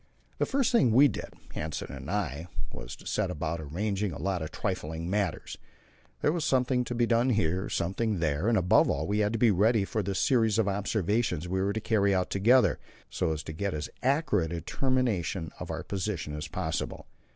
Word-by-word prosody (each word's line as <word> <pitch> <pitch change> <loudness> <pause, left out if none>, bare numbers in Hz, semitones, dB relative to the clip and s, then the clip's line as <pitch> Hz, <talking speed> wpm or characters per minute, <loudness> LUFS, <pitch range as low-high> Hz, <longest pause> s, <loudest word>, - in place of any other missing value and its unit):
The - - +1
first 265 -1 +1
thing 235 - +4
we 140 +5 +7
did - - -5 0.2
Hanssen 75 -2 -4
and 65 +2 -8
I 85 -6 -2 0.3
was - - -7
to - - -17
set - - 0
about 80 +2 -3
arranging 100 +6 -2
a - - -6
lot 95 -3 -1
of 80 - -4
trifling 85 -4 -3
matters; 100 -5 -2 0.6
there 150 - +3
was 170 -1 -1
something 125 -2 +2
to 120 - -4
be 120 0 +3
done 115 +2 +2
here, 95 -4 +1
something 100 +4 -1
there, 80 +2 0
and 115 -1 +3
above 90 -2 +4
all 75 +3 0
we 105 +3 0
had 105 0 +2
to - - 0
be 115 -1 +5
ready 105 +2 +3
for 110 - -1
the 100 0 -3
series 110 -2 +3
of 110 -3 +2
observations 100 -3 0
we 95 +1 -1
were 100 +1 +1
to 110 - -1
carry 100 -3 +2
out 90 -1 0
together, 120 +7 +4 0.3
so - - 0
as 80 -1 -3
to 80 - -6
get 100 +2 -2
as 75 - -4
accurate 135 - +1
a - - -2
determination 105 - -1
of - - -6
our - - -4
position 95 -6 -3
as 75 +1 -5
possible. - - -3
100 Hz, 205 wpm, -29 LUFS, 85-115 Hz, 0.6 s, we